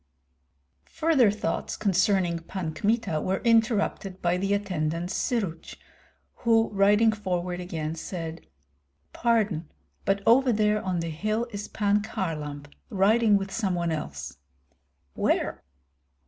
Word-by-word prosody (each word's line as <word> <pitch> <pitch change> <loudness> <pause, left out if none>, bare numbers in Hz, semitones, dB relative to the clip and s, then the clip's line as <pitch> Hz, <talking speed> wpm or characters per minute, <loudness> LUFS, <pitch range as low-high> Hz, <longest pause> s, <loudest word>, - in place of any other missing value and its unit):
Further 310 -8 +4
thoughts 200 -5 -2
concerning 190 -3 +2
Pan 165 -1 -5
Kmita 205 -3 0
were 190 +1 -1
interrupted 220 -4 +1
by 175 0 +1
the 195 +2 -1
attendant 175 -3 -2
Syruts, 200 - -2 0.6
who 225 -1 +3
riding 205 +3 +4
forward 180 -4 -3
again 160 -4 -4
said: 165 0 -6 0.7
"Pardon, 210 -9 +1 0.3
but 195 0 0
over 250 +3 +5
there 210 -1 +2
on 180 -3 -1
the 165 - -3
hill 215 +8 -1
is 205 0 -5
Pan 205 -1 +1
Kharlamp 150 -8 -5 0.2
riding 210 +2 +4
with 195 0 -4
some 195 -4 -1
one 170 -1 -1
else." 150 - -5 0.8
"Where?" - - 0
195 Hz, 120 wpm, -26 LUFS, 170-215 Hz, 0.8 s, over